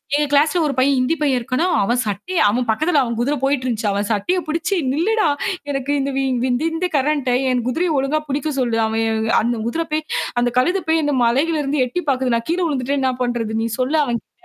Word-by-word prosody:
எங்க 295 0 +2
கிளாஸ்ல 300 +5 +3
ஒரு 290 - 0
பையன் 270 +2 +3
ஹிந்தி 255 +6 +1
பையன் 275 -4 +2
இருக்கனா, 255 +7 -1 0.2
அவன் 240 +5 +1
சட்டைய 215 - -4
அவன் 245 +3 -1
பக்கத்துல 305 +7 +2
அவன் 235 -2 -3
குதிர 280 +5 +1
போயிட்டுருந்துச்சு. 255 -5 0
அவன் 200 +1 -1
சட்டைய 220 - 0
புடிச்சு 335 +5 -1 0.2
"நில்லுடா, 415 +9 +1 0.5
எனக்கு 275 0 -2
இந்த 275 +1 -2 0.4
இந்த 245 +5 0
ஹிந்தி 325 +3 -2
காரன்ட்ட 280 -2 +1 0.2
என் 250 -2 0
குதிரைய 330 +7 0
ஒழுங்கா 275 +3 +1
புடிக்க 290 +2 -1
சொல்லு. 240 -3 0
அவன் 220 0 0 0.2
அந்த 235 +1 -1
குதிர 330 +7 -1
போய் 310 0 0 0.4
அந்த 245 0 +1
கழுத 360 +9 +1
போய் 320 0 +3
என்ன 290 -1 0
மலையில 285 +7 +2
இருந்து 275 0 0
எட்டி 305 +9 -3
பாக்குது. 255 -2 +1
நான் 230 +4 -3
கீழ 350 - 0
விழுந்துட்டா 280 -3 -1
இன்னா 260 -1 +1
பண்றது? 240 -3 -2
நீ - - 0
சொல்லு 270 +5 +1
அவன்கிட்ட" 240 -4 -4
270 Hz, 200 wpm, -20 LUFS, 240-310 Hz, 0.5 s, கிளாஸ்ல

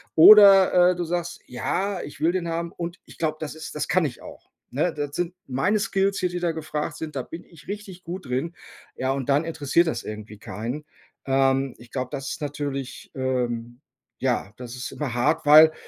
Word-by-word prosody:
Oder, 195 -1 +8
äh, - - -2
du 175 - -2
sagst: 175 0 -3
„Ja, 190 +9 -2
ich 145 - -10
will 165 +2 +4
den 180 -2 -2
haben 165 +1 -3
und 170 +1 -6
ich - - -15
glaube, 155 -1 -1
das 155 0 -5
ist 160 -1 -8
das 150 - -2
kann 180 -2 +2
ich 125 - -5
auch, - - -13 0.2
ne? 155 +6 0
Das 145 -1 -4
sind 175 0 -2
meine 160 +12 +1
Skills 195 -2 0
hier, 180 - 0
die 175 0 -4
da 175 -1 0
gefragt 155 -2 -4
sind, 155 -2 -6
da 130 - -2
bin 165 +2 -9
ich 165 -2 -18
richtig 195 -3 -7
gut 175 -3 -7
drin.“ 135 +7 -2 0.4
Ja 130 +1 -1
und 135 -2 -4
dann 145 +3 +3
interessiert 165 +1 +1
das 120 -7 -2
irgendwie 105 0 -8
keinen. 115 +9 -5 0.4
Ähm, 135 0 +2
ich 120 0 -15
glaube, 130 -1 -3
das 140 -1 -4
ist - - -6
natürlich 140 -2 -5
ähm, 120 -2 -2 0.4
ja, 100 - -1
das 125 -1 -8
ist 125 +1 -6
immer 135 -6 -3
hart, 150 +6 +1
weil, 155 +2 +8
155 Hz, 205 wpm, -24 LUFS, 130-175 Hz, 0.4 s, Oder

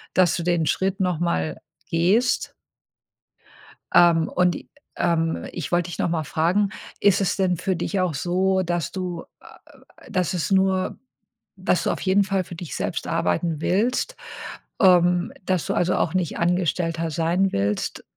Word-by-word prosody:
dass 180 -2 +4
du - - -2
den 175 -2 +1
Schritt 190 +3 0
noch 180 -4 0
mal 80 - -1 0.3
gehst 190 +9 +2 1.4
ähm, 170 -2 +5
und 180 -1 +2
i - - -10 0.3
ähm, 165 -1 0
ich 175 -2 -5
wollte 175 0 +1
dich - - -7
noch - - +1
mal 165 -2 -1
fragen, 170 +7 +1 0.3
ist 200 -1 +4
es 190 - +1
denn 185 -3 +1
für 185 +2 -1
dich 185 +3 -2
auch 180 -5 0
so, 185 +4 +1
dass 175 -2 -2
du, 180 -3 -4 0.2
äh - - -21 0.7
dass 180 -1 0
es 175 +2 -1
nur 190 -1 +2 0.6
dass - - 0
du - - +1
auf - - -3
jeden 195 +1 +3
Fall 195 -1 0
für 175 - -9
dich 170 -2 -7
selbst - - -3
arbeiten 150 - 0
willst, 240 - 0 0.7
ähm, 180 -1 +4
dass 185 -4 0
du, - - 0
also, 180 +1 +1
auch 160 - 0
nicht 180 -4 -1
Angestellter 170 -2 0
sein 170 +5 +1
willst? 100 +1 -1
175 Hz, 160 wpm, -23 LUFS, 165-190 Hz, 1.4 s, ähm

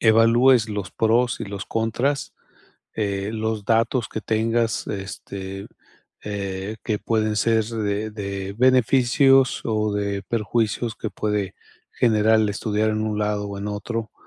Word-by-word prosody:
evalúes 115 +1 +5
los 100 -3 -4
pros 115 +2 +2
y - - -2
los 100 -1 -6
contras, 120 +5 -1 0.6
eh, 100 -1 -2
los 110 -1 -2
datos 115 +3 +1
que - - -4
tengas, 115 +1 0
este, 95 -1 -6 0.6
eh, 100 0 -4
que 105 -2 -1
pueden 110 -1 0
ser 110 +1 +3
de 110 -1 -2
de 100 -2 -5
beneficios, 130 +2 +4
o 105 -2 0
de 100 -1 -2
perjuicios 115 +1 -1
que 110 - -4
puede 105 -2 -2 0.4
generar 110 -1 +3
estudiar 105 +1 0
en 110 - -1
un 110 -1 -2
lado 105 -1 -1
o 100 - -6
en 100 +1 -4
otro, 110 +1 -4
110 Hz, 135 wpm, -23 LUFS, 100-115 Hz, 0.6 s, evalúes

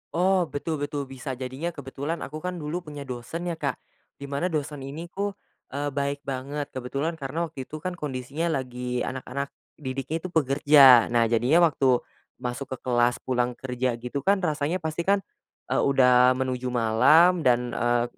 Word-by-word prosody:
Oh, 185 +2 +3
betul 160 0 -3
betul, 145 -1 -3
bisa 135 +1 -6
jadinya 130 +6 -4
kebetulan 145 +2 -5
aku 155 +2 -7
kan 180 -1 -3
dulu 160 +3 -4
punya 145 -3 -8
dosen 130 +8 -5
ya, 170 - -1
Kak. 145 -3 -3 0.4
Di 140 - -7
mana 145 +6 -1
dosen 150 -2 -3
ini 150 +5 -6
tuh, 200 +3 -3 0.4
eee, 145 +1 -2
baik 140 0 -2
banget, 140 +2 -3
kebetulan 140 +6 -2
karena 160 +3 -3
waktu 140 -4 -7
itu 155 +4 -8
kan 185 +3 -4
kondisinya 145 +2 -3
lagi 125 -1 -4
anak-anak 130 +1 -4 0.3
didiknya 135 +1 -4
itu 185 - -5
pekerja. 140 -5 +6
Nah, 115 -1 +2
jadinya 125 +9 +4
waktu 135 -6 +3 0.4
masuk 125 +2 -4
ke - - -16
kelas, 120 -1 +1
pulang 125 -1 0
kerja 125 -1 -2
gitu 125 +4 -4
kan, 195 +6 +2
rasanya 155 +2 -1
pasti 160 +2 -3
kan, 200 0 +3 0.5
eee, - - +2
udah 125 -2 +5
menuju 130 -1 -2
malam 125 +10 +5
dan, 125 -4 +2
eee, 120 0 +1
140 Hz, 170 wpm, -26 LUFS, 125-160 Hz, 0.5 s, pekerja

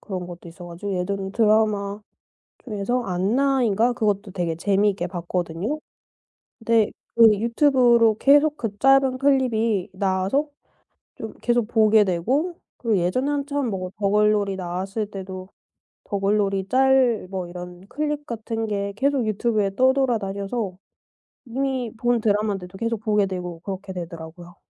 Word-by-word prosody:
그런 185 -4 -5
것도 175 -1 -10
있어 175 +1 -11
가지고 175 +4 -6
예전에 190 +1 -2
드라마 210 -2 +2 0.6
중에서 225 +2 -2
안나인가 230 +4 +1
그것도 205 -3 -1
되게 175 -3 -2
재미있게 200 0 +1
봤거든요. 175 - -3 0.8
근데 225 -2 +2 0.3
그 230 -1 +8
유튜브로 235 -1 +4
계속 290 +2 +4
그 220 -6 -4
짧은 270 +1 +4
클립이 230 -8 +1
나와서 190 +9 0 0.7
좀 220 -1 -7
계속 240 -2 +1
보게 220 -2 +4
되고 255 - 0 0.2
그리고 225 -4 0
예전에 185 +11 0
한참 285 -2 -1
뭐 185 -2 -4
더글로리 205 -1 +2
나왔을 190 +4 -3
때도 190 -1 -7 0.6
더글로리 195 -1 0
짤 260 -5 +3
뭐 185 -2 -4
이런 180 0 -9
클립 295 0 -3
같은 225 -1 -4
게 200 -1 -2
계속 270 +1 +1
유튜브에 210 -2 0
떠돌아다녀서 220 -6 0 0.7
이미 255 -1 -2
본 240 +1 +1
드라마인데도 205 -3 -1
계속 230 0 -2
보게 210 -2 +2
되고 180 -3 -5
그렇게 190 0 -6
되더라고요. 170 0 -9
210 Hz, 305 characters per minute, -23 LUFS, 190-240 Hz, 0.8 s, 그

